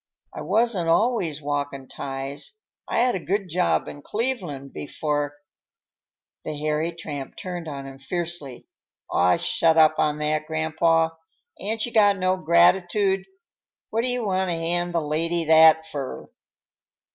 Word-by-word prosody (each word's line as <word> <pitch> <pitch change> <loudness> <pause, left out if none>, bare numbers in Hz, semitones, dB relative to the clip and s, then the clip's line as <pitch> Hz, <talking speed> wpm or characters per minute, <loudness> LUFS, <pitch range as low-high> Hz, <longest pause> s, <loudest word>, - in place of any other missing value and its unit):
I - - -6
wasn't 215 -7 +1
always 170 - +1
walkin' 140 -2 -3
ties; 135 +1 -6 0.3
I - - +1
had 250 0 +3
a - - -2
good 195 +2 -2
job 180 +2 +1
in 145 - -8
Cleveland 180 - -3
before—" 145 0 -3 1.1
The 155 -1 -5
hairy 155 +2 -1
tramp 150 -5 -7
turned 175 -3 -6
on 140 -2 -6
him 135 0 -10
fiercely. 160 -3 -4 0.5
"Aw, 90 0 +4
shut 165 -1 +2
up 155 -1 +5
on 150 -1 +2
that, 155 0 -1
grandpaw! 160 +1 +2 0.5
Ain't 220 +3 -1
you 240 - -6
got 205 -2 +5
no 185 0 +1
gratitude? 185 +3 +3 0.7
What 225 - +1
do 245 - -1
you 245 -2 -1
want 190 -1 0
to 170 - 0
hand 175 +1 0
the 170 - +2
lady 165 +3 0
that 160 0 +6
fur?" 140 -4 -6
165 Hz, 145 wpm, -24 LUFS, 150-185 Hz, 1.1 s, that